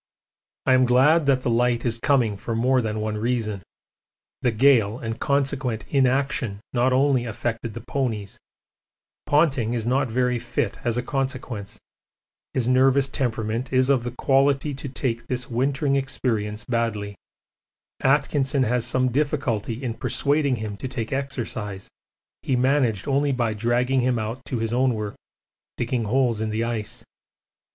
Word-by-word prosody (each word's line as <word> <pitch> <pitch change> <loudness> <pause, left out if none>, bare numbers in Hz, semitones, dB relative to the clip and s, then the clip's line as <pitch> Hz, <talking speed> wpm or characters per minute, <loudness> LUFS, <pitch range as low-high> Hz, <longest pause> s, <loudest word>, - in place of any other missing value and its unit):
I 130 - +4
am 130 0 +5
glad 140 +6 +4
that 135 -2 +3
the 125 - -1
light 120 +1 +1
is 115 -1 0
coming 120 -6 +2
for 115 +3 -4
more 130 +3 +3
than 110 -1 -2
one 105 0 -2
reason. 110 -3 -1 0.8
The - - +2
gale 115 -2 +4
and 115 -2 -5
consequent 135 -5 0
inaction 130 -6 +1
not 125 +1 +2
only 130 -1 +3
affected 115 0 -4
the - - -6
ponies, 110 -8 -3 0.9
Ponting 135 -6 +2
is 115 -2 -2
not 130 +2 +1
very 125 +1 +1
fit 120 -2 -2
as 120 -1 0
a 125 - -1
consequence 130 -6 -4 0.8
his 125 -3 +1
nervous 135 +2 +4
temperament 115 -2 -2
is 130 +1 +3
of 130 -4 +2
the 120 - -2
quality 135 +3 +2
to 135 +1 -6
take 120 -3 -3
this 125 +1 -3
wintering 135 +3 +1
experience 115 -6 -2
badly 115 -4 -1 0.9
Atkinson 135 0 +2
has 120 0 0
some 130 -1 +1
difficulty 130 -4 -1
in 120 -3 -2
persuading 140 +3 +1
him 105 -3 -5
to 130 - -5
take 125 -3 -4
exercise 110 -7 -4 0.5
he 130 - 0
managed 125 -5 +1
only 140 +1 +2
by 120 -3 0
dragging 120 +4 +1
him 125 0 +1
out 115 +4 -4
to 125 - -3
his 115 0 -2
own 125 -1 +2
work, 105 -1 -4 0.6
digging 120 -1 -1
holes 120 -1 +1
in 110 - -1
the 110 +2 -1
ice. 115 0 -4
125 Hz, 150 wpm, -24 LUFS, 115-135 Hz, 0.9 s, am